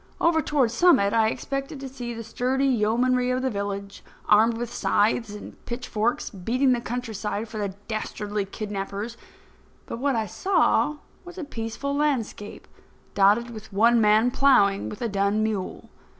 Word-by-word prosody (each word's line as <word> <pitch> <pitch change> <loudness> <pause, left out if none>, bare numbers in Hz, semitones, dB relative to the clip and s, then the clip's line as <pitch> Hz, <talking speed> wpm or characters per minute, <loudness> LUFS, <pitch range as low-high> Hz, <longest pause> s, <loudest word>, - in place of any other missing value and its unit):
Over 330 -1 +3
toward 275 -7 +1
Summit 240 - +4
I 225 -1 +4
expected 275 +4 -4
to 270 - -6
see 250 -2 -6
the 230 -1 -6
sturdy 255 +4 -1
yeomanry 250 +1 +2
of 255 +1 0
the 260 - 0
village 200 -1 -5 0.2
armed 225 +2 +4
with 240 0 -5
scythes 220 +2 +1
and 210 - -11
pitchforks 240 -1 -2
beating 245 +8 +1
the 245 -1 +1
countryside 225 -3 -4
for 220 -1 -7
the 200 -2 -3
dastardly 210 -2 -3
kidnappers. 205 +2 -5 0.7
But 230 - -6
what 275 0 +1
I 220 -1 0
saw 300 - +2 0.3
was 355 0 -12
a 355 - -4
peaceful 275 +2 -4
landscape 265 -8 -2 0.5
dotted 210 +4 +3
with 215 -3 -10
one 230 +4 +4
man 215 +3 +4
ploughing 205 -8 +3
with 210 - -7
a - - +1
dun 200 +1 +1
mule. 210 -4 -4
230 Hz, 155 wpm, -25 LUFS, 210-255 Hz, 0.7 s, Summit